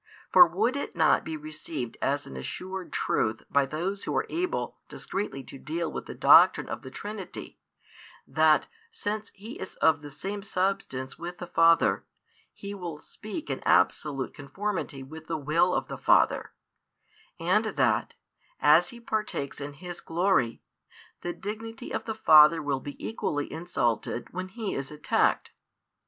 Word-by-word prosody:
For 355 Hz, -, +10 dB
would 250 Hz, +3 st, 0 dB
it 280 Hz, -, -4 dB
not 160 Hz, -2 st, +4 dB
be 160 Hz, -1 st, -4 dB
received 155 Hz, -4 st, -6 dB
as 145 Hz, +1 st, 0 dB
an 65 Hz, -, -10 dB
assured 185 Hz, -, -6 dB
truth 110 Hz, +1 st, 0 dB
by 140 Hz, -1 st, +3 dB
those 185 Hz, +7 st, -3 dB
who -, -, -2 dB
are -, -, +1 dB
able 360 Hz, +2 st, -2 dB
discreetly 160 Hz, -9 st, -4 dB
to 135 Hz, -, -11 dB
deal 165 Hz, +3 st, -3 dB
with -, -, -6 dB
the -, -, -7 dB
doctrine -, -, +6 dB
of -, -, -5 dB
the 130 Hz, -, -9 dB
Trinity, 205 Hz, +5 st, -7 dB, 0.7 s
that, 155 Hz, +2 st, +4 dB, 0.2 s
since 215 Hz, -, -4 dB
He 215 Hz, +5 st, -9 dB
is 190 Hz, -, -6 dB
of 160 Hz, -1 st, +3 dB
the 145 Hz, -, -8 dB
same 195 Hz, +8 st, -5 dB
Substance 185 Hz, -10 st, -2 dB
with 175 Hz, +1 st, -6 dB
the 180 Hz, -, -6 dB
Father, 165 Hz, -, +4 dB, 0.5 s
He 200 Hz, 0 st, -8 dB
will 175 Hz, -6 st, -6 dB
speak 215 Hz, -, -8 dB
in -, -, -2 dB
absolute 140 Hz, -4 st, +2 dB
conformity 165 Hz, -2 st, -4 dB
with 160 Hz, +3 st, -11 dB
the 165 Hz, -, -2 dB
Will 155 Hz, +5 st, +2 dB
of -, -, -1 dB
the -, -, -7 dB
Father; -, -, +3 dB, 0.9 s
and -, -, +2 dB
that, -, -, +1 dB, 0.4 s
as 155 Hz, +5 st, +5 dB
He 240 Hz, -, -10 dB
partakes 210 Hz, -12 st, -3 dB
in 145 Hz, +1 st, -5 dB
His 175 Hz, +4 st, -7 dB
glory, 165 Hz, -, +1 dB, 0.6 s
the 175 Hz, -, -3 dB
dignity 225 Hz, +6 st, -7 dB
of -, -, -3 dB
the 220 Hz, -, -3 dB
Father 155 Hz, -5 st, +7 dB
will 145 Hz, -3 st, -1 dB
be 145 Hz, +1 st, -8 dB
equally 145 Hz, -9 st, -2 dB
insulted 120 Hz, -8 st, -2 dB
when 185 Hz, +1 st, -4 dB
He 210 Hz, +1 st, -4 dB
is 135 Hz, -1 st, -3 dB
attacked? 150 Hz, 0 st, +1 dB
165 Hz, 155 wpm, -28 LUFS, 145-200 Hz, 0.9 s, For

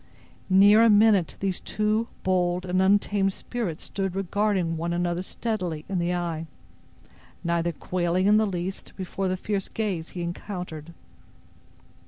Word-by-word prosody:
Near 200 Hz, +3 st, +7 dB
a 230 Hz, -, +6 dB
minute 205 Hz, -4 st, +4 dB
these 195 Hz, -2 st, -1 dB
two 215 Hz, +2 st, 0 dB, 0.2 s
bold 180 Hz, -1 st, +1 dB
and 185 Hz, +1 st, +1 dB
untamed 195 Hz, 0 st, +2 dB
spirits 210 Hz, -10 st, -4 dB
stood 195 Hz, -2 st, -3 dB
regarding 195 Hz, -3 st, 0 dB
one 170 Hz, +2 st, -2 dB
another 175 Hz, 0 st, 0 dB
steadily 185 Hz, -6 st, -3 dB
in 190 Hz, -2 st, -1 dB
the 175 Hz, +1 st, 0 dB
eye, 165 Hz, -2 st, -3 dB, 1.0 s
neither 170 Hz, 0 st, 0 dB
quailing 180 Hz, +2 st, -1 dB
in 210 Hz, +1 st, +6 dB
the 215 Hz, 0 st, +3 dB
least 185 Hz, 0 st, -5 dB
before 190 Hz, 0 st, -3 dB
the 185 Hz, 0 st, -1 dB
fierce 195 Hz, 0 st, -2 dB
gaze 190 Hz, -7 st, -3 dB
he 175 Hz, -, -2 dB
encountered. 170 Hz, -2 st, -6 dB
185 Hz, 140 wpm, -26 LUFS, 175-205 Hz, 1.0 s, Near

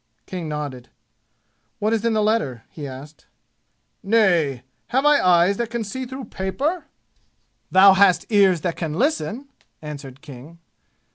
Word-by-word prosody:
King 175 Hz, -4 st, -6 dB
nodded. 145 Hz, -5 st, -6 dB, 0.9 s
"What 215 Hz, +2 st, 0 dB
is 225 Hz, -1 st, -1 dB
in 230 Hz, -1 st, +1 dB
the 215 Hz, -1 st, +1 dB
letter?" 150 Hz, -, -1 dB
he 150 Hz, -3 st, -7 dB
asked. 140 Hz, +3 st, -12 dB, 0.7 s
"Nay! 175 Hz, -, +2 dB, 0.2 s
Have 265 Hz, +3 st, 0 dB
I 295 Hz, -1 st, +5 dB
eyes 180 Hz, +2 st, +4 dB
that 235 Hz, -1 st, -2 dB
can 235 Hz, -1 st, -3 dB
see 255 Hz, +5 st, -6 dB
through 260 Hz, 0 st, -7 dB
paper?" 280 Hz, -, -3 dB, 0.8 s
"Thou 190 Hz, +1 st, +7 dB
hast 190 Hz, -2 st, +4 dB
ears 195 Hz, -5 st, +4 dB
that 170 Hz, 0 st, -2 dB
can 160 Hz, -3 st, -4 dB
listen!" 275 Hz, -, -1 dB, 0.3 s
answered 140 Hz, -3 st, -9 dB
King. 150 Hz, +2 st, -12 dB
190 Hz, 140 wpm, -22 LUFS, 150-225 Hz, 0.9 s, Thou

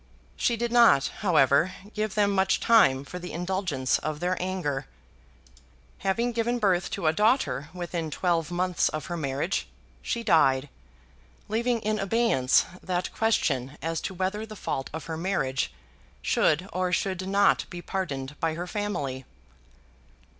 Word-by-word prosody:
She 235 Hz, -, +1 dB
did 235 Hz, +1 st, -2 dB
not, 235 Hz, -, +5 dB
however, 160 Hz, -, +3 dB, 0.2 s
give 215 Hz, -1 st, -2 dB
them 205 Hz, -1 st, +3 dB
much 190 Hz, -1 st, +2 dB
time 140 Hz, -13 st, +4 dB
for 180 Hz, -, -7 dB
the 180 Hz, 0 st, -7 dB
indulgence 175 Hz, -6 st, -1 dB
of 155 Hz, -1 st, -4 dB
their 180 Hz, +2 st, 0 dB
anger. 180 Hz, -7 st, -2 dB, 1.1 s
Having 230 Hz, +5 st, 0 dB
given 235 Hz, +1 st, 0 dB
birth 190 Hz, -5 st, +1 dB
to 185 Hz, -, -4 dB
a 155 Hz, -, +4 dB
daughter 160 Hz, -, +1 dB
within 175 Hz, -2 st, -4 dB
twelve 170 Hz, +1 st, 0 dB
months 180 Hz, 0 st, +1 dB
of 155 Hz, -, -5 dB
her 175 Hz, -, -4 dB
marriage, 145 Hz, +3 st, -2 dB, 0.3 s
she 235 Hz, -, -2 dB
died, 145 Hz, -8 st, +3 dB, 0.8 s
leaving 230 Hz, +2 st, 0 dB
in 215 Hz, 0 st, -1 dB
abeyance 195 Hz, -, +3 dB, 0.2 s
that 180 Hz, -1 st, -2 dB
question 145 Hz, -, 0 dB
as 165 Hz, +3 st, -2 dB
to 190 Hz, -, -5 dB
whether 190 Hz, +4 st, -2 dB
the 220 Hz, -1 st, -9 dB
fault 135 Hz, -8 st, -3 dB
of 160 Hz, +1 st, -6 dB
her 160 Hz, -1 st, -4 dB
marriage 160 Hz, -, -1 dB, 0.5 s
should 165 Hz, +5 st, +2 dB
or 185 Hz, 0 st, 0 dB
should 185 Hz, 0 st, -1 dB
not 200 Hz, +1 st, +3 dB
be 175 Hz, -, -7 dB
pardoned 150 Hz, -8 st, -4 dB
by 160 Hz, -1 st, 0 dB
her 175 Hz, +2 st, -4 dB
family. 175 Hz, -11 st, -3 dB
180 Hz, 145 wpm, -27 LUFS, 150-205 Hz, 1.1 s, not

